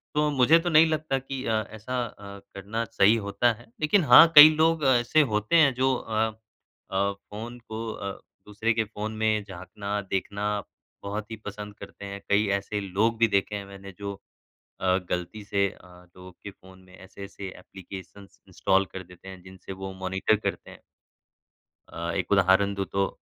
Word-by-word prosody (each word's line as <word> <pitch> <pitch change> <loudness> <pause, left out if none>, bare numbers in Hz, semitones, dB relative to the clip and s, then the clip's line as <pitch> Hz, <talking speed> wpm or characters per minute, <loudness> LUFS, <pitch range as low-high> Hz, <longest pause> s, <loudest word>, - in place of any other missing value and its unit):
तो 150 0 +2
मुझे 145 +5 +5
तो 175 - -2
नहीं 160 0 +6
लगता 155 -3 -1
कि 135 0 -6
अ, 110 -1 +1
ऐसा 120 +3 -4
अ, 100 -2 -11 0.2
करना 105 +4 -4
सही 110 -1 +3
होता 110 +4 +2
है, 120 +2 -17
लेकिन 170 +4 +3
हाँ, 165 - +9
कई 150 +1 +12
लोग 160 -1 +2
ऐसे 125 +4 +3
होते 105 +10 0
हैं 145 -5 +5
जो 130 +1 +2
अ 110 -2 -1 0.6
अ, 100 +1 +1
फ़ोन 110 +5 -10
को 115 0 -7
अ, 100 -1 -5 0.4
दूसरे 110 +2 -1
के 110 0 0
फ़ोन 110 0 -6
में 110 -1 +1
झाँकना, 100 +2 -6
देखना 100 +1 -3 0.5
बहुत 105 +2 -5
ही - - -4
पसंद 105 0 -7
करते 100 - -10
हैं। 100 0 -7
कई 105 +1 +3
ऐसे 105 +1 -4
लोग 105 +4 0
भी 115 - +5
देखे 100 +1 0
हैं 100 -1 -5
मैंने 100 0 -11
जो 100 0 -4 0.7
अ, 95 -1 +2
ग़लती 90 +4 -4
से 100 -1 +1
अ, - - -17 0.3
लोगों 90 0 -12
के 100 +3 -11
फ़ोन 95 0 -18
में 90 0 -17
ऐसे-ऐसे 100 +1 -9
ऐप्लिकेशंस 95 +1 -12
इंस्टॉल 95 0 +1
कर 95 - -6
देते 90 +1 -14
हैं 95 -1 -11
जिनसे 95 0 -10
वो 95 0 -7
मॉनिटर 95 +3 +1
करते - - -5
हैं। - - -14 1.1
अ, 85 0 -4
एक 95 0 -2
उदाहरण 100 +1 +4
दूँ 100 0 -2
तो 95 0 +1
105 Hz, 180 wpm, -26 LUFS, 95-115 Hz, 1.1 s, कई